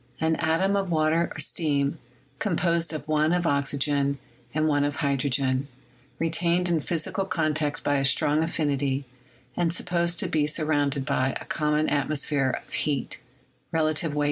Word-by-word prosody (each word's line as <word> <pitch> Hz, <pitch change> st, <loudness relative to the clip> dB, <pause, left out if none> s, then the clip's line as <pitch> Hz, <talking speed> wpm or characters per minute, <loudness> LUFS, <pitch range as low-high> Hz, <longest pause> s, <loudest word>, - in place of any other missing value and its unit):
An 160 Hz, 0 st, +2 dB
atom 170 Hz, +5 st, +1 dB
of 195 Hz, -2 st, 0 dB
water 160 Hz, +1 st, +2 dB
or -, -, -7 dB
steam, 145 Hz, -2 st, 0 dB, 0.4 s
composed 170 Hz, -4 st, 0 dB
of 155 Hz, -1 st, -6 dB
1 155 Hz, +1 st, +2 dB
of 180 Hz, -1 st, +1 dB
oxy 140 Hz, -2 st, +1 dB
gen 140 Hz, 0 st, +1 dB, 0.3 s
and 155 Hz, +3 st, +1 dB
1 145 Hz, -2 st, +2 dB
of 145 Hz, 0 st, -1 dB
hydrogen, 135 Hz, -1 st, +1 dB, 0.5 s
retained 170 Hz, +2 st, +1 dB
in 170 Hz, -2 st, +2 dB
physical 165 Hz, +5 st, -2 dB
con 155 Hz, -4 st, 0 dB
tact 150 Hz, -1 st, -1 dB
by 145 Hz, 0 st, +2 dB
a 135 Hz, -, 0 dB
strong 145 Hz, +4 st, +4 dB
affinity, 140 Hz, -4 st, 0 dB, 0.5 s
and 170 Hz, -2 st, +1 dB
supposed 170 Hz, -1 st, -1 dB
to -, -, +1 dB
be 150 Hz, -2 st, +1 dB
sur 155 Hz, +1 st, -1 dB
rounded 145 Hz, -3 st, +1 dB
by 130 Hz, 0 st, 0 dB
a -, -, -10 dB
common 150 Hz, 0 st, 0 dB
atmosphere 145 Hz, -1 st, +1 dB, 0.2 s
of -, -, -16 dB
heat 140 Hz, -4 st, -1 dB, 0.5 s
8 -, -, +3 dB, 0.2 s
22. 150 Hz, -3 st, -2 dB
155 Hz, 165 wpm, -26 LUFS, 140-165 Hz, 0.5 s, strong